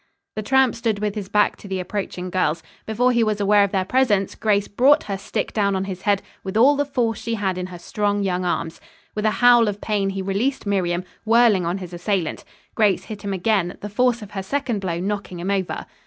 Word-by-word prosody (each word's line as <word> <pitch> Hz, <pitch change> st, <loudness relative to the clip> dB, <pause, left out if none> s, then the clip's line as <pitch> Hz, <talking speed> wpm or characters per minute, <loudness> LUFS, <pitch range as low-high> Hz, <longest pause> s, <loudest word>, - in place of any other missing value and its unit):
The 215 Hz, -, -2 dB
tramp 265 Hz, +2 st, +3 dB
stood 225 Hz, -3 st, -1 dB
with 210 Hz, 0 st, -2 dB
his 205 Hz, -3 st, -6 dB
back 210 Hz, 0 st, +2 dB
to -, -, -12 dB
the 190 Hz, -1 st, -3 dB
approaching 185 Hz, -1 st, -4 dB
girls. 165 Hz, -3 st, 0 dB, 0.2 s
Before 245 Hz, +3 st, +2 dB
he 235 Hz, -1 st, +3 dB
was 215 Hz, -1 st, 0 dB
aware 205 Hz, 0 st, +4 dB
of 200 Hz, -, +1 dB
their 190 Hz, -2 st, 0 dB
presence, 210 Hz, -5 st, +2 dB
Grace 205 Hz, -2 st, +1 dB
brought 275 Hz, +8 st, +4 dB
her 200 Hz, -, -3 dB
stick 195 Hz, -, -4 dB
down 200 Hz, -2 st, +1 dB
on 190 Hz, -, -1 dB
his 190 Hz, -2 st, -6 dB
head 200 Hz, -1 st, +1 dB, 0.2 s
with 190 Hz, +2 st, -3 dB
all 270 Hz, +6 st, +6 dB
the 290 Hz, 0 st, 0 dB
force 240 Hz, -6 st, -1 dB
she 230 Hz, 0 st, -2 dB
had 195 Hz, -3 st, -1 dB
in 180 Hz, 0 st, -4 dB
her 180 Hz, -1 st, -9 dB
strong, 205 Hz, +3 st, -1 dB
young 185 Hz, -1 st, -1 dB
arms. 165 Hz, -2 st, -2 dB, 0.3 s
With 210 Hz, 0 st, -3 dB
a 215 Hz, -, -1 dB
howl 240 Hz, -2 st, +7 dB
of 205 Hz, -1 st, -2 dB
pain 205 Hz, -2 st, 0 dB
he 195 Hz, 0 st, -3 dB
released 215 Hz, +9 st, -1 dB
Miriam, 180 Hz, -3 st, 0 dB, 0.2 s
whirling 225 Hz, -5 st, +4 dB
on 175 Hz, +3 st, -1 dB
his 180 Hz, -2 st, -8 dB
assailant. 180 Hz, -1 st, -2 dB, 0.3 s
Grace 200 Hz, -4 st, +2 dB
hit 210 Hz, 0 st, -8 dB
him 200 Hz, -, -4 dB
again, 190 Hz, -2 st, 0 dB
the 205 Hz, -, -5 dB
force 235 Hz, +2 st, +1 dB
of 210 Hz, -, -11 dB
her 195 Hz, -, -4 dB
second 245 Hz, +1 st, -2 dB
blow 170 Hz, -3 st, -2 dB
knocking 195 Hz, -1 st, -3 dB
him 185 Hz, +3 st, -2 dB
over. 190 Hz, -2 st, -2 dB
205 Hz, 230 wpm, -22 LUFS, 190-220 Hz, 0.3 s, howl